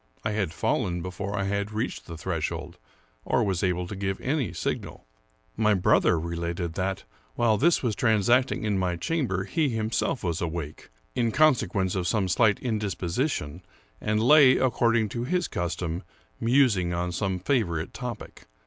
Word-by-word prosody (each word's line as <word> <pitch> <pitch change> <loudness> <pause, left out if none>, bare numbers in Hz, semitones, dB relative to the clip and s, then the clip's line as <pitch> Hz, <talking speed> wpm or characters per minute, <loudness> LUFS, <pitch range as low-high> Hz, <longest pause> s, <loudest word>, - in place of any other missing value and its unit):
I 110 - +1
had 100 -6 -1
fallen 85 +1 -1
before 100 +3 -4
I 100 - 0
had 100 +1 -2
reached 110 +4 -3
the 85 - -7
threshold 85 -3 -4 0.4
or - - +1
was 95 -4 0
able 90 -1 0
to 105 - -6
give 95 0 -2
any 135 -2 -1
signal. - - -4 0.5
My 105 -1 +3
brother 90 -2 +3
related 85 +1 -3
that, 95 +2 -2 0.3
while 115 -2 +3
this 160 +8 +3
was 115 -4 0
transacting 120 +3 +2
in 105 -3 0
my 90 -1 0
chamber, 115 - -1
he 150 - 0
himself 115 +2 -1
was 85 -3 -1
awake, 80 -3 -5 0.2
in 115 -2 +1
consequence 105 - +2
of 90 -2 -1
some 95 0 +1
slight 105 +3 +3
indisposition, 100 - -2 0.4
and 110 0 0
lay, 130 0 +7
according 115 -3 +2
to 120 +2 -3
his 180 +6 0
custom, 85 0 -3 0.4
mus 125 -1 +4
ing 90 -2 -1
on 90 +1 -2
some 95 +1 -1
favorite 90 - -1
topic. - - -7
100 Hz, 160 wpm, -26 LUFS, 90-115 Hz, 0.5 s, lay